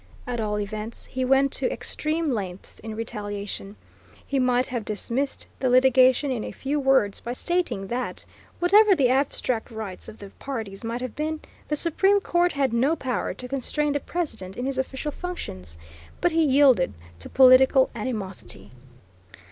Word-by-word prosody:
At 245 -1 -3
all 210 -1 -1
events 215 +2 -6
he 260 - -3
went 270 +1 +3
to 265 - -1
extreme 305 +6 -2
lengths 190 -5 -5
in 220 0 -7
retaliation. 205 -2 -5 0.5
He 275 - -1
might 250 0 +2
have 240 -3 -4
dismissed 235 +7 -3
the 260 - +1
litigation 255 +2 +5
in 240 -4 -2
a - - -5
few 285 +2 -2
words 265 -7 +2
by 240 - -5
stating 345 - -1
that, 245 +5 -4 0.3
whatever 400 +3 +6
the 270 -6 +3
abstract 260 -3 0
rights 220 -5 -7
of 220 - -11
the 200 -1 -11
parties 225 -8 -5
might 230 +2 -3
have 255 -3 -5
been, 310 +1 -2 0.3
the 300 - 0
Supreme 385 +6 +2
Court 350 -2 +1
had 275 -4 0
no 265 +7 +2
power 260 -6 -2
to 250 - -8
constrain 280 +3 -1
the 290 - 0
President 225 - -5
in 245 - -3
his 270 -1 -2
official 265 +3 -3
functions; 95 - -7 0.4
but 350 - +2
he 325 0 +3
yielded 260 - +4 0.2
to - - -9
political 260 0 +6
animosity. 200 - -6
255 Hz, 165 wpm, -25 LUFS, 220-285 Hz, 0.5 s, whatever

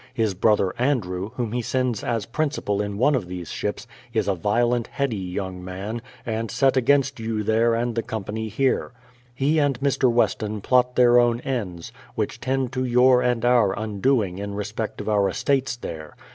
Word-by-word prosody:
His 110 -5 +1
brother 95 -1 +2
Andrew, 105 -8 0
whom 120 -4 -2
he 125 +1 -1
sends 125 -2 -1
as 115 -4 -1
principal 135 -7 -1
in 100 -1 -4
one 135 +7 +3
of 120 -10 -1
these 90 -2 -6
ships, 105 +3 -3 0.3
is 110 - 0
a 100 - +2
violent, 120 +6 +1
heady 140 -5 -2
young 95 -1 -5
man, 100 +5 -5 0.2
and 115 0 -2
set 135 +5 +2
against 135 +1 +2
you 110 -1 -2
there 115 +2 +2
and 120 +1 -1
the 115 - -1
company 110 0 -4
here. 130 +3 0 0.4
He 145 +5 +2
and 140 -4 +1
Mr. 135 -2 +2
Weston 110 -2 0
plot 125 +2 +2
their 120 -1 +6
own 120 -1 +2
ends, 105 -7 -4 0.2
which 105 -2 -2
tend 130 -1 -1
to 130 0 -1
your 125 0 +5
and 125 -2 0
our 120 -6 +3
undoing 110 -2 0
in 100 0 -5
respect 105 +2 -4
of - - -8
our 100 -2 +2
estates 135 -3 0
there. 80 -10 -8
115 Hz, 180 wpm, -24 LUFS, 105-125 Hz, 0.4 s, their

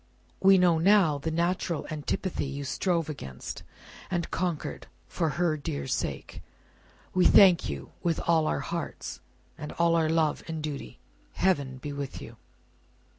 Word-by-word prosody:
We 195 0 +6
know 175 -3 +4
now, 180 -5 +4
the 160 +3 -3
natural 170 0 -1
antipathy 155 +1 -2
you 140 +1 -5
strove 165 +3 0
against, 70 - -7 0.5
and 175 -2 -2
conquered, 175 -4 -3 0.2
for 165 -2 -1
her 170 -3 +1
dear 70 - -4
sake. - - -3 0.7
We 185 -1 +3
thank 185 - +7
you 70 -2 -6
with 170 -2 0
all 160 -2 +2
our - - 0
hearts, 170 0 -5 0.4
and 150 - -6
all 170 0 +2
our 160 -1 +2
love 160 -2 +1
and 160 -1 -4
duty. 150 -3 -5 0.4
Heaven 140 -9 +1
be 145 +2 -6
with 140 -1 -5
you!" - - -11
160 Hz, 145 wpm, -28 LUFS, 145-175 Hz, 0.7 s, thank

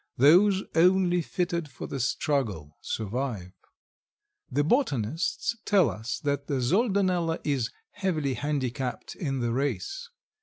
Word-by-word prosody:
Those 185 - +6
only 180 +1 +4
fitted 170 -2 -2
for 130 - -8
the 135 - -5
struggle 115 - -1
survive. 110 -4 -3 1.0
The 145 +3 +1
botanists 160 - 0
tell 190 - +4
us 110 +5 -4
that 140 -1 -1
the 140 -3 0
Soldanella 185 - +1
is 135 -5 0 0.2
heavily 155 -8 -1
handicapped 130 -3 -3
in 135 -6 -2
the 120 -1 0
race. 145 - -2
145 Hz, 115 wpm, -27 LUFS, 125-180 Hz, 1.0 s, Those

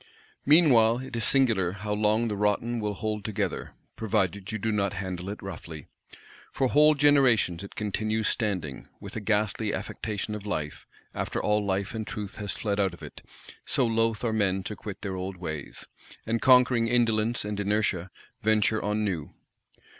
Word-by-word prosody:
Meanwhile 125 -8 +6
it 130 -1 -7
is 115 - -2
singular 110 -9 +2
how 105 +2 -4
long 105 +2 +2
the 105 - -2
rotten 105 +4 0
will 105 -1 -2
hold 105 0 -3
together, 110 -3 -3 0.2
provided 100 -2 -1
you 110 - -2
do 110 +2 -1
not 100 -2 0
handle 95 -1 -4
it 105 - -7
roughly. 80 -6 -8 0.7
For 130 - +1
whole 150 +2 +6
generations 135 - +4
it 100 - -10
continues 110 +1 -1
standing, 90 - -2
"with - - -9
a - - -2
ghastly 105 0 0
affectation 105 0 -4
of 105 -1 -5
life," 75 -8 -4 0.3
after - - -2
all 105 0 +1
life 100 0 -1
and 110 -2 -4
truth 105 -2 -6
has 105 -2 -3
fled 105 -2 -2
out 95 -3 +1
of - - -16
it; - - -10 0.4
so 130 - +2
loth 115 -1 +1
are 115 -2 0
men 95 -3 +1
to 105 - -5
quit 100 -1 -8
their 95 -2 -3
old 95 0 -5
ways; 80 -5 -6 0.4
and, 115 0 -1
conquering 125 -2 +5
indolence 115 -1 +1
and 105 -1 -3
inertia, 100 -3 0 0.3
venture 110 +1 +2
on 105 +1 0
new. 85 -8 -3
105 Hz, 170 wpm, -27 LUFS, 100-115 Hz, 0.7 s, Meanwhile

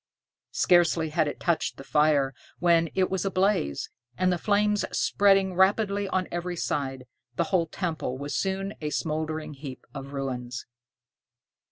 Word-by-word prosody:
Scarcely 170 -2 +4
had 155 0 +1
it 145 - -4
touched 170 -2 0
the - - -9
fire 150 -3 +3 0.2
when 170 -2 +3
it 185 -1 +2
was 190 -2 0
ablaze, 190 - 0 0.3
and 185 0 +2
the 175 - -2
flames 210 +1 +2
spreading 195 -2 +3
rapidly 200 +2 +2
on 185 -1 0
every 175 +1 -3
side, 135 -5 -2 0.3
the - - +2
whole 170 -3 +3
temple 160 -7 -3
was 145 +2 -4
soon 195 +1 -1
a 150 - -2
smoldering 155 0 -2
heap 135 -2 -9
of 140 -1 -7
ruins. 125 -3 -4
170 Hz, 145 wpm, -27 LUFS, 145-190 Hz, 0.3 s, Scarcely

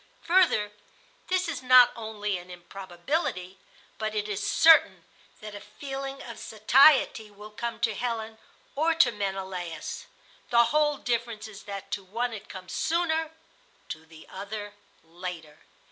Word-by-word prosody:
Further, 335 - +3 0.6
this 370 0 +1
is 330 - -4
not 255 -1 +7
only 210 -4 -3
an 175 +1 -14
improbability, 180 - -4 0.4
but 215 0 -3
it 210 0 -1
is 205 -1 -3
certain 325 +8 +5 0.4
that 215 -1 -8
a 205 - -7
feeling 270 +4 -7
of 235 -2 -9
satiety 230 0 +4
will 210 +1 -12
come 230 +2 -5
to 225 -3 +2
Helen 225 0 -4 0.4
or 325 +3 +2
to 295 -7 +5
Menelaus. 190 -5 -5 0.4
The 235 0 +6
whole 300 -1 +3
difference 235 -3 -2
is 215 -1 -12
that 195 -1 -7
to 200 - -3
one 230 +5 -3
it 215 -1 -9
comes 185 -1 -9
sooner, 320 -1 0 0.6
to 155 +1 -7
the 160 -1 -14
other 205 +1 -7 0.3
later. 165 -2 -8
215 Hz, 140 wpm, -27 LUFS, 195-255 Hz, 0.6 s, not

